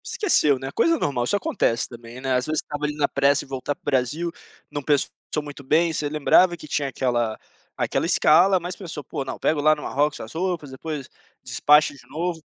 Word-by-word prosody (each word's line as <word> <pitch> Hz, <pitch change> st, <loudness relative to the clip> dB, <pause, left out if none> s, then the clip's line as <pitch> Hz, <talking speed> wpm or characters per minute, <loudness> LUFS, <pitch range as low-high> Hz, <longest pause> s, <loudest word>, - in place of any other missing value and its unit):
Esqueceu, 150 Hz, -, +2 dB
né, 135 Hz, +1 st, -6 dB
coisa 330 Hz, -, +2 dB
normal, 130 Hz, -, -1 dB
isso 125 Hz, -, +1 dB
acontece 200 Hz, -, 0 dB
também, 120 Hz, 0 st, -11 dB
né. 130 Hz, 0 st, -1 dB
Às 125 Hz, 0 st, +1 dB
vezes, 155 Hz, 0 st, 0 dB
você -, -, -6 dB
estava 150 Hz, 0 st, -4 dB
ali 150 Hz, 0 st, -2 dB
na 145 Hz, -1 st, +1 dB
pressa 140 Hz, 0 st, +2 dB
em -, -, -20 dB
voltar 135 Hz, +1 st, -3 dB
para 170 Hz, -, -44 dB
o -, -, -38 dB
Brasil, 145 Hz, +5 st, 0 dB, 0.4 s
não 145 Hz, -, -3 dB
pensou 145 Hz, 0 st, +1 dB, 0.3 s
muito 145 Hz, -1 st, -9 dB
bem. 160 Hz, +4 st, +2 dB
Você 150 Hz, -1 st, -1 dB
lembrava 170 Hz, +4 st, +4 dB
que 155 Hz, -, -11 dB
tinha 145 Hz, -1 st, -1 dB
aquela 120 Hz, -4 st, -1 dB, 0.4 s
aquela -, -, 0 dB
escala, 185 Hz, +5 st, +5 dB
mas 175 Hz, +1 st, -5 dB
pensou: 165 Hz, -6 st, -7 dB
"Pô, 135 Hz, -, -4 dB
não, 135 Hz, -, -6 dB
pega 155 Hz, -, +1 dB
lá 155 Hz, +1 st, +5 dB
no 150 Hz, -, -9 dB
Marrocos 145 Hz, +2 st, 0 dB
as 110 Hz, -, -8 dB
roupas, 170 Hz, -4 st, -2 dB
depois 140 Hz, +1 st, -6 dB, 0.4 s
despacho 150 Hz, 0 st, +4 dB
de 140 Hz, -, -15 dB
novo". 165 Hz, +3 st, -3 dB
145 Hz, 215 wpm, -23 LUFS, 135-160 Hz, 0.4 s, escala